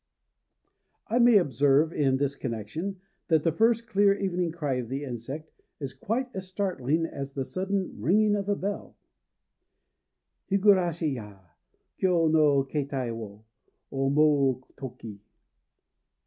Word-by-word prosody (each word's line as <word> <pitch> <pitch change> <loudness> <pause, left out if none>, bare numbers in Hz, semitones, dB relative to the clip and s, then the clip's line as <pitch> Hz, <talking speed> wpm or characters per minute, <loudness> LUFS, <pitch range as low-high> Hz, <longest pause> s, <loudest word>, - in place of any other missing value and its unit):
I 235 +3 +2
may 240 -2 +7
observe, 145 - +3
in 135 -3 +2
this 140 0 -1
connection, 135 - -5 0.3
that 160 -3 +3
the 165 - +2
first 230 +6 +2
clear 200 -2 +3
evening 180 -4 -1
cry 150 -6 -2
of 120 -3 -4
the 135 +2 -3
insect 135 +5 -6 0.3
is 135 -3 -5
quite 225 - -2
as 190 -1 -6
startling 170 -6 -1
as 135 -3 -6
the 135 -2 -2
sudden 190 - -3
ringing 205 - +3
of 200 0 -3
a 205 - +2
bell: 200 +1 -5 1.5
Higurashi 185 -6 +3
ya! 105 -5 -8 0.6
Kyô 170 -4 +3
no 150 -3 +4
kétai 135 -4 -3
wo 110 -1 -9 0.5
Omou 135 -1 +2
toki. 115 -6 -9
155 Hz, 125 wpm, -27 LUFS, 135-190 Hz, 1.5 s, may